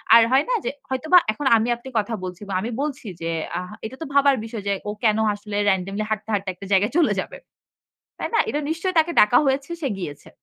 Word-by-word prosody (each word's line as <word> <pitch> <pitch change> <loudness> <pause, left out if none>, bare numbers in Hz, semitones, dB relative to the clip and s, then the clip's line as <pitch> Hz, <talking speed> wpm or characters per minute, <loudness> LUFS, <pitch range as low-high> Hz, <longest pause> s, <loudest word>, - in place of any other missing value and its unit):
আর 230 - +9
হয় 270 +3 +4
না - - +2
যে - - +1 0.2
হয়তোবা 310 +7 +4
এখন 245 +7 -6
আমি 220 - 0
আপনি 240 +3 -11
কথা 215 +2 -3
বলছি 180 0 -6
বা - - -3
আমি 225 - -3
বলছি 285 -5 -4
যে 165 - -2 0.3
আ - - -1 0.3
এটা 230 +4 -6
তো - - -3
ভাবার 280 0 +5
বিষয় 225 -2 -6
যে 200 - +2 0.2
ও - - -1
কেন 215 -2 +3 0.2
আসলে 205 0 -7
র‍্যান্ডমলি 195 +2 -1
হাঁটতে 215 0 -3
হাঁটতে 200 -2 -1
একটা 185 +2 -11
জায়গায় 200 +3 +3
চলে 335 - +4
যাবে। - - -5 0.8
তাই - - -3
না? - - +4
এটা 295 - -1
নিশ্চয়ই 335 +3 -2
তাকে 320 +2 +2
ডাকা 210 +4 +6
হয়েছে 275 +3 0
সে 285 - 0
গিয়েছে। 150 -7 -7
225 Hz, 225 wpm, -23 LUFS, 200-280 Hz, 0.8 s, আর